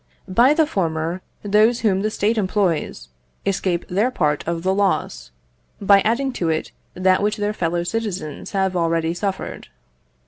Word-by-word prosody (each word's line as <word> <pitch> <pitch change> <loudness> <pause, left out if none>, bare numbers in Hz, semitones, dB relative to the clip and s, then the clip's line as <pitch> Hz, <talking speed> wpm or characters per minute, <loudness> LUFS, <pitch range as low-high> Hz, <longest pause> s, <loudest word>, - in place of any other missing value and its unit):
By 240 +10 +4
the 320 - +4
former, 165 - -2 0.2
those 215 +4 +3
whom 195 -4 +2
the 215 - 0
State 215 +1 0
employs, 185 - -1 0.4
escape 185 -3 -1
their 205 +7 +1
part 150 - 0
of 170 0 -2
the 190 +1 +2
loss, 195 - -1 0.5
by 200 0 +5
adding 235 +6 +1
it 260 - -7
to 160 -2 0 0.3
that 185 +1 +3
which 210 +1 0
their 205 0 -1
fellow 170 -3 -1
citizens 190 -6 -4
have 190 -1 0
already 165 -1 +1
suffered. 190 +2 -4
190 Hz, 150 wpm, -21 LUFS, 170-210 Hz, 0.5 s, by